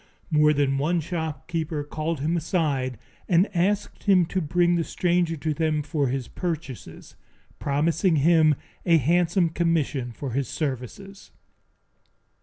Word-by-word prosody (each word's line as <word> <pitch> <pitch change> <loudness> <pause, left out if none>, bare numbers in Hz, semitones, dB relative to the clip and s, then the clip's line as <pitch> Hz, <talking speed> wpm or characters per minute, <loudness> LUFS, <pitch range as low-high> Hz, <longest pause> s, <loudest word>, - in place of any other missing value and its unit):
More 150 -1 +5
than 140 -2 +1
one 170 +5 +1
shopkeeper 160 -1 -3
called 155 +1 -3
him 160 +4 0
aside 145 - -1 0.3
and 180 +2 +4
asked 195 +4 -1
him 190 -4 +5
to 190 - +1
bring 175 +3 +2
the 170 -1 +1
stranger 175 -1 0
to 155 +1 -2
them 155 -1 0
for 145 -2 -1
his 130 -1 -3
purchases, 160 -8 -6 0.4
promising 160 +5 +1
him 155 0 +4 0.3
a 170 -2 +4
handsome 170 +4 +2
commission 160 -7 0
for 130 +3 -6
his 135 +1 -1
services. 155 - -5
160 Hz, 130 wpm, -25 LUFS, 145-175 Hz, 0.4 s, More